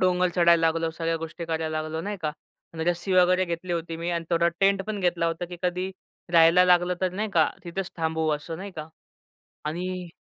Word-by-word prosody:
डोंगर 180 0 +3
चढायला 170 -1 +5
लागलो, 165 0 0
सगळ्या 165 0 -2
गोष्टी 165 +1 -6
करायला 160 -1 -2
लागलो 155 +1 -4
नाही 205 +4 -4
का 150 -1 -1 0.4
आणि 160 0 -3
रस्सी 175 +2 -1
वगैरे 185 0 +4
घेतली 170 +1 -4
होती 165 -1 -3
मी 170 +1 -3
अन् 170 -1 -2
थोडा 170 0 +3
टेंट 195 0 +3
पण 215 -2 -3
घेतला 175 -2 +1
होता 165 +1 -2
की 175 0 -8
कधी 180 +1 -1 0.4
राहायला 165 +2 +7
लागलं, 180 0 +4
तर 185 -1 +1
नाही 210 +3 -2
का 160 -2 +4
तिथेच 180 +2 -4
थांबवू 160 -1 0
असं 150 +2 -3
नाही 195 +4 -7
का 155 0 -6 0.8
आणि 180 +3 -3
170 Hz, 200 wpm, -26 LUFS, 165-180 Hz, 0.8 s, राहायला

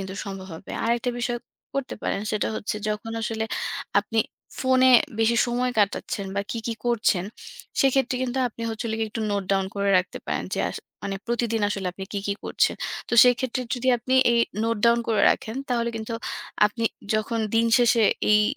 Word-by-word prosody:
কিন্তু 190 0 -6
সম্ভব 195 -1 -6
হবে। 160 - -11
আরেকটা 235 +1 +1
বিষয় 240 0 -1 0.4
করতে 275 -2 -2
পারেন 195 - -1
সেটা 215 - 0
হচ্ছে 210 - -3
যখন 210 +2 -3
আসলে 220 0 -1 0.6
আপনি 220 +2 -3 0.4
ফোনে 260 0 +5 0.3
বেশি 225 +1 +3
সময় 250 +1 0
কাটাচ্ছেন 200 -1 0
বা - - +2
কি, 230 - -3
কি, 230 - 0
করছেন 215 -6 +2 0.6
সেক্ষেত্রে 265 -1 +3
কিন্তু 255 +1 -2
আপনি 230 +1 -10
হচ্ছে 225 +2 -4
যে 220 - -1
একটু 220 +1 -5
note 200 -2 -1
down 195 0 +2
করে 200 0 +1
রাখতে 185 - -3
পারেন - - -1
যে - - -4
আস - - -6 0.3
মানে 195 0 -3
প্রতিদিন 235 -2 0
আসলে 195 -2 -3
আপনি 190 +1 -7
কি, 205 - -1
কি 200 - 0
করছেন। - - +2 0.3
তো - - -9
সেক্ষেত্রে 250 +1 +2
যদি 255 +1 -2
আপনি 255 +3 -1 0.2
এই 235 - +4 0.2
note 230 -2 0
down 235 0 +5
করে 220 -2 +2
রাখেন 220 +3 -2
তাহলে 235 -2 +1
কিন্তু 220 +1 -5 0.5
আপনি 230 +2 -4 0.3
যখন 215 +2 0 0.2
দিনশেষে 230 0 +4 0.3
এই 210 0 +6
230 Hz, 180 wpm, -25 LUFS, 210-240 Hz, 0.6 s, এই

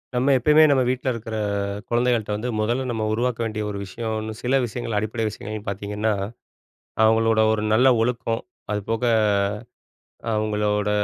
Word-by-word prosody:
நம்ம 130 +3 +3
எப்பயுமே 150 +5 +5
நம்ம 135 -2 +4
வீட்ல 130 +1 -1
இருக்கிற 115 -1 -6 0.5
குழந்தைகள்ட்ட 120 -2 +1
வந்து, 115 +4 -3
மொதல்ல 120 +5 0
நம்ம 110 -2 -2
உருவாக்க 120 +1 -1
வேண்டிய 110 -1 -3
ஒரு 100 - -4
விஷயன்னு, 110 +2 -4
சில 130 +2 +2
விஷயங்கள், 115 -1 -3
அடிப்படை 110 +2 -2
விஷயங்கள்ன்னு 105 0 -6
பாத்தீங்கன்னா, 105 +2 -1 0.9
அவங்களோட 110 0 +4
ஒரு 105 -1 -1
நல்ல 125 +4 +5
ஒழுக்கம். 115 -1 -1 0.3
அதுபோக, 110 +3 -2 1.3
அவங்களோட 105 -1 0
110 Hz, 130 wpm, -23 LUFS, 105-120 Hz, 1.3 s, எப்பயுமே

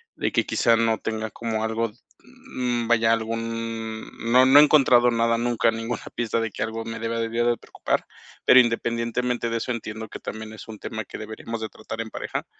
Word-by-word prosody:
de - - -1
que - - +2
quizá 115 - +3
no 115 -1 +2
tenga 110 -1 -3
como 110 0 -3
algo, 110 +1 -1 0.3
mm 125 - -4
vaya, 115 -1 +4
algún, 115 0 -4 0.2
no 125 +2 +6
no 135 +2 +8
he - - +10
encontrado 130 -5 +5
nada 115 0 +2
nunca, 120 -1 +2
ninguna 115 +1 -4
pista 115 -1 0
de 115 -1 -2
que - - -3
algo 110 0 -4
me 115 0 -6
debería 115 +1 -1
de 120 0 +3
preocupar, - - -2 0.4
pero 130 - +8
independientemente 120 0 0
de 115 - -1
eso 115 - -3
entiendo 110 -2 -5
que - - -8
también 110 0 -7
es 110 - -11
un 110 -2 -9
tema 110 -3 -5
que - - -8
deberíamos 110 +1 -6
de 110 - -3
tratar 110 +1 -7
en 115 - -6
pareja, - - -4
115 Hz, 195 wpm, -24 LUFS, 110-120 Hz, 0.4 s, he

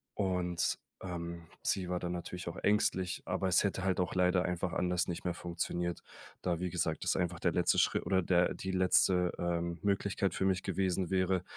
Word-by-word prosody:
Und, 90 -3 0 0.3
ähm, 85 -2 -5 0.2
sie 95 -2 0
war 90 -1 -1
dann 90 0 -3
natürlich 90 0 -6
auch - - -8
ängstlich, 95 -3 +1
aber 95 +1 -1
es 90 - +4
hätte 95 -2 -1
halt 95 -1 +1
auch 90 - -1
leider 90 0 +3
einfach 90 0 -2
anders 90 -1 +1
nicht 85 - -4
mehr 90 - 0
funktioniert. 85 0 -3 0.4
Da 85 -2 -1
wie 90 0 -2
gesagt, 80 -3 -1
das - - +2
einfach 90 -2 -1
der - - +1
letzte - - +3
Schritt - - +2
oder 95 -1 +2
der 90 0 +3
die 95 - -4
letzte, 90 -1 +3
ähm, 85 -1 -1
Möglichkeit 100 -1 0
für 95 - 0
mich 95 -1 +1
gewesen 95 -1 0
wäre, 95 -1 +2
90 Hz, 190 wpm, -33 LUFS, 85-95 Hz, 0.4 s, es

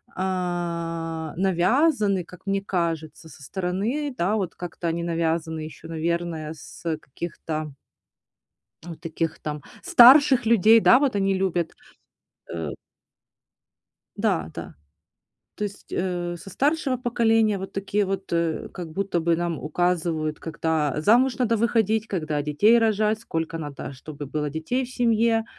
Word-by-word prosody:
а, 170 -3 -3
навязаны, 195 - +2
как 180 +1 -15
мне 195 0 0
кажется, 165 -4 -3
со 140 0 -15
стороны, 200 - -2
да, 185 +5 +1
вот 190 -5 -2
как-то 175 -1 -5
они 165 +1 -1
навязаны 165 -1 -1
ещё, 155 +1 -9
наверное, 165 -1 -2
с, 160 - -13
э, 160 -2 0
каких-то 155 0 -6 1.1
вот 170 -2 -9
таких 165 -1 -3
там 150 -1 -5 0.2
старших 270 -5 +7
людей, 225 0 +6
да, 250 +3 +6
вот 275 -5 +1
они 195 -1 +2
любят, 180 -3 0 0.8
э 80 -3 -3 1.5
Да, 80 -1 0
да. - - -8 0.8
То 210 - -3
есть, 200 -1 -8
э, 175 -1 -2
со 195 - -11
старшего 280 - +1
поколения, 225 -3 +2
вот 190 +1 -7
такие 200 +1 0
вот, 195 0 -4
э, 170 -2 -1
как 175 -3 -6
будто 195 -1 -1
бы 165 0 +2
нам 170 -2 -2
указывают, 160 -1 -1
когда 160 -2 -1
замуж 245 +9 +4
надо 230 -3 +2
выходить, 220 -1 +1
когда 155 -7 -2
детей 205 +11 +4
рожать, 215 -1 +2
сколько 165 -7 -3
надо, 145 -3 -6
чтобы 145 +2 -8
было 150 +1 -2
детей 160 - -2
в 250 - -10
семье, 230 -2 +2
175 Hz, 135 wpm, -24 LUFS, 160-215 Hz, 1.5 s, старших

